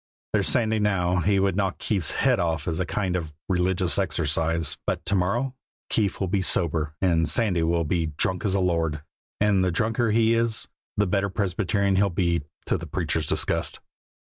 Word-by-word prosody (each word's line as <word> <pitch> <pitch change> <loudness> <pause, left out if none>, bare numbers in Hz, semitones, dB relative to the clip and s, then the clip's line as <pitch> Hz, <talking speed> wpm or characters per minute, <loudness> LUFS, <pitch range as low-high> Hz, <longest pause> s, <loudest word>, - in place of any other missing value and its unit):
There's - - +2
Sandy, 110 -2 +2
now, 90 -4 +1
he 100 +2 +2
would 95 -2 +1
knock 95 -1 -1
Keefe's 95 -8 0
head - - +2
off 80 -3 -1
as 80 -2 -1
a 95 - -1
kind 95 -3 -1
of 80 -4 -4
religious 90 0 +2
exercise; 80 -3 +1
but - - -2
to 95 - 0
morrow 105 +8 0 0.4
Keefe 105 -4 0
will 95 - -1
be 95 +1 0
sober 80 -4 +1
and 80 -4 +2
Sandy 90 0 +2
will 85 +1 +1
be 80 +1 0
drunk 85 +5 -2
as 100 -2 0
a - - +2
lord, 80 -4 0 0.4
and 100 -2 +3
the 90 - +2
drunker 115 +5 0
he 115 +1 +3
is 115 -1 -1 0.3
the 105 - +3
better 100 +1 0
Presbyterian 100 0 0
he'll 100 +1 +3
be, 85 -2 0 0.2
to - - 0
the - - -7
preacher's 80 -3 -1
disgust." - - 0
90 Hz, 185 wpm, -25 LUFS, 85-100 Hz, 0.4 s, and